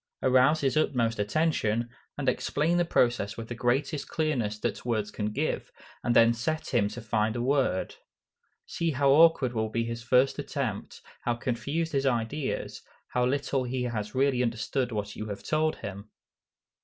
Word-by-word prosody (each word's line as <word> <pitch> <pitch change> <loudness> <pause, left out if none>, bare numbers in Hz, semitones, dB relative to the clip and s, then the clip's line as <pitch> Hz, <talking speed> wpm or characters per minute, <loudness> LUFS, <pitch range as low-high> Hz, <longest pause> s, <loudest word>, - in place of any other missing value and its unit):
Arouse 130 +4 +4
his 135 0 +1
utmost 120 -7 +1
attention, 115 -2 +1 0.3
and 145 -2 -3
explain 150 +6 +1
the 175 - +3
process 120 -9 +1
with 115 -1 -7
the - - -3
greatest 135 +4 0
clearness 130 -10 -1
that - - -3
words 110 -4 -1
can 105 - -3
give, - - -2 0.3
and 120 - +1
then 115 0 +6
set 155 +8 -3
him 110 -5 +3
to 115 - -7
find 110 -1 0
a 120 - -2
word. 130 -8 +1 0.7
See 170 - -2
how 140 0 +3
awkward 150 -4 +5
will 110 -1 -1
be 115 +1 -1
his 115 0 -4
first 125 +3 +3
attempt, - - -4 0.2
how 120 - 0
confused 140 +8 -2
his 135 -1 +1
ideas, 130 +4 -2 0.3
how 125 0 +1
little 135 0 0
he 125 0 -2
has 110 -2 -3
really 135 -1 +2
understood 120 +2 -1
what 105 -1 -4
you 110 - -5
have 100 -1 -6
told 155 0 +1
him. 100 +2 -8
125 Hz, 170 wpm, -28 LUFS, 115-140 Hz, 0.7 s, then